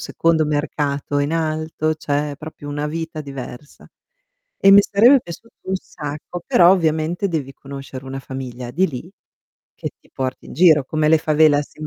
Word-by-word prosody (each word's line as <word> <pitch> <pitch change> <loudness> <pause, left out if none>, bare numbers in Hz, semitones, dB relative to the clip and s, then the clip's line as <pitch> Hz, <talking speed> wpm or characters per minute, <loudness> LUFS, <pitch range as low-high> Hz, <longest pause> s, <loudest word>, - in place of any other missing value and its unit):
secondo 165 -1 +1
mercato 145 -1 -1
in 145 +2 0
alto, 155 -1 -1
c'è 145 -1 -2
proprio 155 -1 -10
una 145 +1 -3
vita 160 +1 -5
diversa. 140 -1 -9 0.7
E 195 - +5
mi 200 +1 +9
sarebbe 235 +8 +5
piaciuto 230 +4 -11
un 190 - 0
sacco, 155 +1 -7
però 175 0 +6
ovviamente 165 +1 +1
devi 145 -5 -3
conoscere 135 -1 -9
una 135 +1 -5
famiglia 125 -2 -7
di 185 +9 +2
lì, 155 +6 -8 0.6
che - - -5
ti - - -26
porti 130 -1 -4
in - - -10
giro, 160 -5 +5
come 155 +2 0
le 160 +1 +5
favelas 150 -1 +2
in 155 - -6
155 Hz, 160 wpm, -20 LUFS, 140-165 Hz, 0.7 s, mi